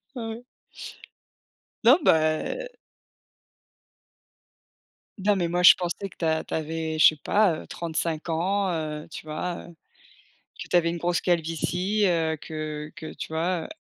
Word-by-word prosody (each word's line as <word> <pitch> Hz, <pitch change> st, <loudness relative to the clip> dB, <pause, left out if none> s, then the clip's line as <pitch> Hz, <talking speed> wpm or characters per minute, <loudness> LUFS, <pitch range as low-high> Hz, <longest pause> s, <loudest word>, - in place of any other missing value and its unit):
Ah 225 Hz, -2 st, -4 dB
ouais. 225 Hz, +2 st, -7 dB, 1.4 s
Non, 260 Hz, +8 st, +7 dB
bah 160 Hz, -, +2 dB, 2.5 s
Non, 200 Hz, +1 st, +2 dB
mais 175 Hz, -3 st, 0 dB
moi, 175 Hz, +1 st, 0 dB
je -, -, +10 dB
pensais 185 Hz, +1 st, -4 dB
que -, -, -19 dB
tu -, -, -4 dB
a 160 Hz, 0 st, +1 dB
tu -, -, -7 dB
avais, 160 Hz, 0 st, -3 dB
je -, -, +8 dB
sais 155 Hz, -, -1 dB
pas, 205 Hz, -5 st, +3 dB
heu, -, -, -12 dB
35 165 Hz, -1 st, -3 dB
ans, 190 Hz, +4 st, 0 dB
heu, 155 Hz, -2 st, -4 dB
tu 155 Hz, -, -9 dB
vois, 170 Hz, +3 st, -4 dB
heu, 170 Hz, -, -14 dB, 0.9 s
que -, -, -11 dB
tu 180 Hz, -, +2 dB
avais 170 Hz, -1 st, +3 dB
une 170 Hz, -, -4 dB
grosse 175 Hz, +1 st, 0 dB
calvitie, 175 Hz, +4 st, 0 dB
heu, 160 Hz, -3 st, +1 dB
que 155 Hz, -1 st, -6 dB
que 160 Hz, -2 st, -8 dB
tu -, -, -6 dB
vois, 170 Hz, +1 st, -1 dB
heu -, -, -9 dB
170 Hz, 155 wpm, -26 LUFS, 160-185 Hz, 2.5 s, je